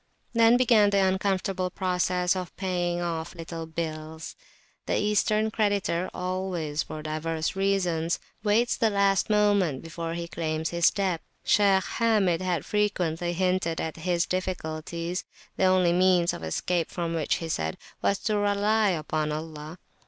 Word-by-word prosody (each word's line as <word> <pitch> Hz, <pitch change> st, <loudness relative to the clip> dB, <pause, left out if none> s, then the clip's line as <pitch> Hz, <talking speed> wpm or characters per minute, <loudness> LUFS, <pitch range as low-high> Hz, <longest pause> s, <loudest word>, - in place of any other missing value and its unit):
Then 230 Hz, +1 st, +5 dB
began 230 Hz, -5 st, +5 dB
the 200 Hz, -, +1 dB
uncomfortable 190 Hz, -1 st, 0 dB
process 180 Hz, 0 st, 0 dB
of 185 Hz, -2 st, -6 dB
paying 175 Hz, -2 st, -1 dB
off 170 Hz, 0 st, -3 dB
little 165 Hz, -1 st, -6 dB
bills. 160 Hz, 0 st, -5 dB, 0.5 s
The -, -, +1 dB
Eastern 210 Hz, +1 st, +1 dB
creditor 200 Hz, -5 st, 0 dB
always, 180 Hz, -4 st, -2 dB
for 155 Hz, 0 st, -7 dB
divers 155 Hz, +2 st, -2 dB
reasons, 180 Hz, -4 st, +1 dB, 0.3 s
waits 225 Hz, +3 st, +2 dB
the 225 Hz, -, +2 dB
last 200 Hz, -1 st, +2 dB
moment 205 Hz, -9 st, +2 dB
before 165 Hz, 0 st, -5 dB
he 170 Hz, 0 st, -4 dB
claims 160 Hz, -1 st, -2 dB
his 170 Hz, 0 st, +4 dB
debt. 190 Hz, -5 st, -1 dB, 0.2 s
Shaykh 195 Hz, -2 st, +4 dB
Hamid 210 Hz, -8 st, +1 dB
had 175 Hz, -4 st, -1 dB
frequently 175 Hz, -5 st, 0 dB
hinted 180 Hz, -2 st, 0 dB
at 160 Hz, 0 st, -4 dB
his 170 Hz, +1 st, 0 dB
difficulties; 170 Hz, -1 st, -3 dB, 0.3 s
the 190 Hz, -, +2 dB
only 185 Hz, -2 st, +4 dB
means 180 Hz, -1 st, +3 dB
of -, -, -7 dB
escape 165 Hz, -, -1 dB
from 170 Hz, -2 st, -3 dB
which, 160 Hz, -3 st, 0 dB
he 165 Hz, -, -4 dB
said, 80 Hz, -, -2 dB, 0.2 s
was 200 Hz, -, +2 dB
to 215 Hz, -1 st, +1 dB
rely 205 Hz, +1 st, +2 dB
upon 155 Hz, -3 st, -1 dB
Allah. 155 Hz, +1 st, -6 dB
180 Hz, 145 wpm, -27 LUFS, 165-195 Hz, 0.5 s, Then